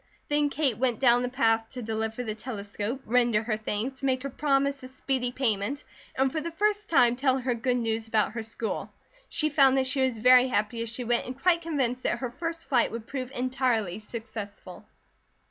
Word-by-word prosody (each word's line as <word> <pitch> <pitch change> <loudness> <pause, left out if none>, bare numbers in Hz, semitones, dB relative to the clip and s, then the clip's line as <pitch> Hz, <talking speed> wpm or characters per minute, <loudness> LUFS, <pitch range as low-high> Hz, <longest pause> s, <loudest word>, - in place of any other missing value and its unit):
Then 295 0 +2
Kate 280 -6 0
went 245 -3 +1
down 245 -2 +5
the 250 - -1
path 225 -3 +1
to 250 -2 -6
deliver 220 +2 -3
the 220 -3 -3
telescope, 210 +2 -5
render 235 -2 +2
her 215 -1 -1
thanks, 220 +4 -3
make 260 -1 0
her 275 - -4
promise 280 0 +1
of 255 - -9
speedy 260 -1 -2
payment, 245 +1 -1 0.3
and 265 0 +2
for 315 - -2
the 335 - -4
first 415 +4 0
time 245 -6 +5
tell 260 0 +2
her 255 -1 -1
good 245 +2 0
news 225 -1 -1
about 220 -1 +1
her 225 +1 -4
school. 225 0 -4 0.4
She 310 -1 0
found 275 -2 +5
that 265 - +2
she 260 +1 0
was 260 -3 +1
very 250 +3 +6
happy 230 -1 -1
as 230 - -3
she 235 +2 -4
went 240 0 +1
and 255 +1 -7
quite 340 +1 +3
convinced 265 -7 -1
that 240 - 0
her 250 -1 -4
first 330 +4 -5
flight 245 -4 +2
would 230 -1 -6
prove 255 -1 -5
entirely 245 -7 -1
successful. 215 -4 -8
250 Hz, 200 wpm, -27 LUFS, 225-270 Hz, 0.4 s, very